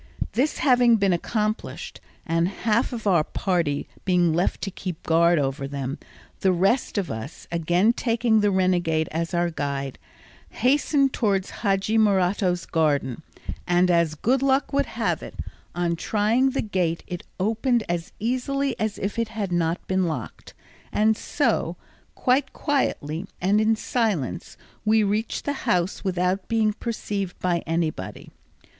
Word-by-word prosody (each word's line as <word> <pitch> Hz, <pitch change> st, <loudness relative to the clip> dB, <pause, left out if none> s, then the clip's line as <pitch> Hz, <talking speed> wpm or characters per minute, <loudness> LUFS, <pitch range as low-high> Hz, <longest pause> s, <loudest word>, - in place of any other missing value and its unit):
This 270 Hz, +6 st, 0 dB
having 245 Hz, -4 st, +5 dB
been 200 Hz, -4 st, +2 dB
accomplished, 215 Hz, +5 st, -3 dB, 0.2 s
and 165 Hz, +1 st, +1 dB
half 220 Hz, +6 st, 0 dB
of 230 Hz, -3 st, -6 dB
our 175 Hz, -6 st, +4 dB
party 165 Hz, -5 st, -1 dB, 0.2 s
being 175 Hz, -3 st, +3 dB
left 175 Hz, +3 st, 0 dB
to 195 Hz, -, -2 dB
keep 180 Hz, -3 st, -6 dB
guard 170 Hz, +1 st, +4 dB
over 135 Hz, -1 st, -1 dB
them, 140 Hz, +1 st, -4 dB, 0.4 s
the 190 Hz, -, +3 dB
rest 195 Hz, +8 st, +1 dB
of 195 Hz, -3 st, -1 dB
us, 110 Hz, +7 st, -7 dB
again 175 Hz, +6 st, +2 dB
taking 230 Hz, -2 st, +2 dB
the 205 Hz, 0 st, +3 dB
renegade 175 Hz, -4 st, +1 dB
as 165 Hz, +2 st, -2 dB
our 175 Hz, 0 st, +1 dB
guide, 140 Hz, -3 st, -3 dB, 0.5 s
hastened 275 Hz, +2 st, +2 dB
towards 200 Hz, -4 st, 0 dB
Hadji 200 Hz, +1 st, +2 dB
Morato's 190 Hz, -3 st, +2 dB
garden, 150 Hz, -4 st, 0 dB, 0.5 s
and 180 Hz, +1 st, +3 dB
as 170 Hz, -2 st, +2 dB
good 250 Hz, -, +1 dB
luck 275 Hz, +1 st, +2 dB
would 280 Hz, 0 st, +2 dB
have -, -, -1 dB
it, -, -, -9 dB, 0.4 s
on 175 Hz, -1 st, 0 dB
trying 220 Hz, +8 st, +2 dB
the 270 Hz, -, -1 dB
gate 180 Hz, -6 st, -1 dB
it 175 Hz, -1 st, -5 dB, 0.2 s
opened 225 Hz, +4 st, +1 dB
as 170 Hz, 0 st, -3 dB
easily 255 Hz, +4 st, -1 dB
as 215 Hz, -1 st, -1 dB
if 200 Hz, +4 st, -3 dB
it 230 Hz, -, +1 dB
had 215 Hz, -4 st, -4 dB
not 170 Hz, 0 st, 0 dB
been 190 Hz, -1 st, +1 dB
locked; 160 Hz, -, -6 dB, 0.4 s
and 220 Hz, +1 st, +3 dB
so, -, -, 0 dB, 0.4 s
quite 260 Hz, +2 st, +1 dB
quietly 195 Hz, -, -1 dB
and 200 Hz, +4 st, +3 dB
in 220 Hz, +1 st, +3 dB
silence, 210 Hz, -, -2 dB, 0.3 s
we 215 Hz, 0 st, +4 dB
reached 210 Hz, +3 st, -1 dB
the 285 Hz, -, 0 dB, 0.2 s
house 180 Hz, +1 st, +1 dB
without 185 Hz, 0 st, 0 dB
being 220 Hz, -2 st, +2 dB
perceived 205 Hz, -4 st, -4 dB
by 175 Hz, -2 st, 0 dB
anybody. 160 Hz, -, -3 dB
190 Hz, 145 wpm, -24 LUFS, 170-225 Hz, 0.5 s, having